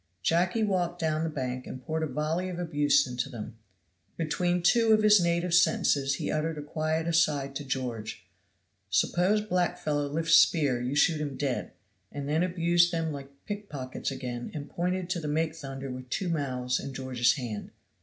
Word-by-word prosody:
Jacky 180 +6 +2
walked 180 -4 0
down 160 -1 0
the 165 - -1
bank 130 -4 -4
and 130 - -6
poured 160 +3 -2
a 160 - 0
volley 155 +6 -2
of 180 - -5
abuse 145 -4 +3
into 125 -1 -3
them. 115 -1 -8 0.6
Between 175 +2 0
two 225 +4 +5
of 215 0 +4
his 210 -2 +7
native 170 0 +1
sentences 145 -5 +3
he - - -3
uttered 155 +1 -1
a 150 - -5
quiet 155 +2 -1
aside 150 -5 +1
to 145 - -6
George, 115 -7 -4 0.6
"Suppose 190 +5 +2
black 180 -3 0
fellow 145 -3 -1
lift 165 +3 -2
spear 145 -6 +5
you 125 +3 -2
shoot 155 +1 +3
him 145 -3 -4
dead," 135 -4 -2 0.4
and 140 -1 -5
then 155 +3 +1
abused 175 -1 +3
them 165 -2 -1
like 140 -2 -7 0.2
pickpockets 150 -12 -5
again 125 -3 -5
and 145 -1 -6
pointed 180 +1 -1
to 175 - 0
the 155 - -5
make 160 +1 0
thunder 135 -3 -6
with 130 0 -8
two 180 +7 -2
mouths 130 -5 -1
in 135 -1 -7
George's 125 -2 +2
hand. 120 -7 -5
155 Hz, 180 wpm, -28 LUFS, 135-175 Hz, 0.6 s, his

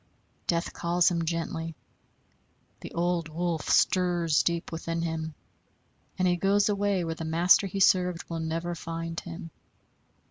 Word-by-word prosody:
Death 170 0 0
calls 175 +1 +2
him 170 -1 -1
gently; 165 -1 -3 1.0
the - - -9
old 170 -1 0
wolf 170 0 -2
stirs 175 -4 +3
deep 170 -1 -1
within 165 0 -3
him, 160 -1 -3 0.8
and 185 -1 +2
he 175 0 +2
goes 200 +3 +3
away 200 -2 +1
where 165 -1 -2
the 165 - -7
master 170 +5 +4
he 195 +1 -4
served 180 -3 +3
will 165 -1 -4
never 165 +2 -2
find 165 0 -5
him. 170 -1 -8
170 Hz, 140 wpm, -28 LUFS, 165-180 Hz, 1.0 s, master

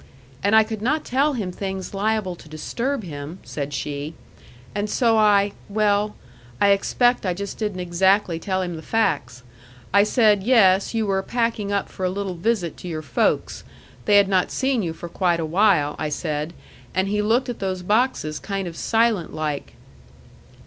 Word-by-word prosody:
"And 200 +2 +3
I 220 - +7
could 215 -1 -6
not 295 +7 0
tell 280 +4 +2
him 205 -8 -3
things 190 0 -5
liable 205 -2 0
to 155 - -15
disturb 235 - -3
him," 150 0 -7
said 145 -1 -5
she, 145 +3 -4 0.6
"and 205 +1 -2
so 230 0 +3
I 205 -2 +4 0.2
well, 210 0 +1 0.4
I 200 - +4
expect 245 +5 +2
I 180 -3 -1
just 200 +2 -6
didn't 210 -4 -2
exactly 180 0 +2
tell 185 +2 -1
him 175 -2 -4
the - - -8
facts. 140 - -1 0.5
I 200 - +7
said 210 -1 +3
yes, 200 -3 +4
you 225 -1 +1
were 195 -1 +1
packing 230 -1 -1
up 200 -1 0
for 190 - -8
a 185 - +2
little 195 0 -3
visit 180 -1 -1
to - - -9
your 155 -2 -4
folks. 130 -5 0 0.4
They 205 - +5
had 200 -1 +5
not 190 -2 +2
seen 265 -3 0
you 165 -4 -2
for 175 - -8
quite 175 0 0
a 165 - -1
while, 165 -4 +3
I 155 - -1
said. 150 +1 -3 0.4
And 190 +1 +1
he 210 +1 0
looked 230 +5 +2
at 245 - -5
those 185 -2 -3
boxes 210 - +1
kind 195 -2 -3
of 165 - -7
silent 225 -6 +1
like." 150 -2 -3
195 Hz, 180 wpm, -23 LUFS, 170-215 Hz, 0.6 s, I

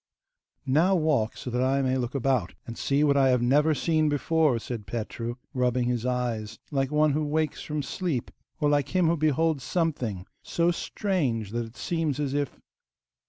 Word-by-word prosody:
'Now 160 +8 +3
walk, 150 -10 +1
so 125 - -6
that 125 +1 0
I 135 +1 +2
may 130 0 +1
look 125 0 -2
about, 130 -8 0
and 115 - -7
see 140 +4 +1
what 145 -1 +4
I 135 -1 +4
have 125 -2 +3
never 150 +5 +3
seen 155 0 +2
before,' 150 -2 +2
said 115 -2 -6
Petru, 115 +1 -4 0.2
rubbing 125 -1 +1
his 125 0 -1
eyes 115 -4 -2
like 135 -2 0
one 150 0 +3
who 155 +2 0
wakes 155 +1 -1
from 150 -1 -3
sleep, 160 -6 -3 0.3
or 150 - +2
like 145 +3 +1
him 180 -2 +4
who 165 +1 +3
beholds 155 -2 +1
something 125 - -1 0.2
so 170 +1 +1
strange 145 - -1
that 120 0 -2
it 115 +2 -16
seems 155 +1 -1
as 140 -2 -1
if... 145 -1 -2
140 Hz, 180 wpm, -27 LUFS, 120-155 Hz, 0.3 s, what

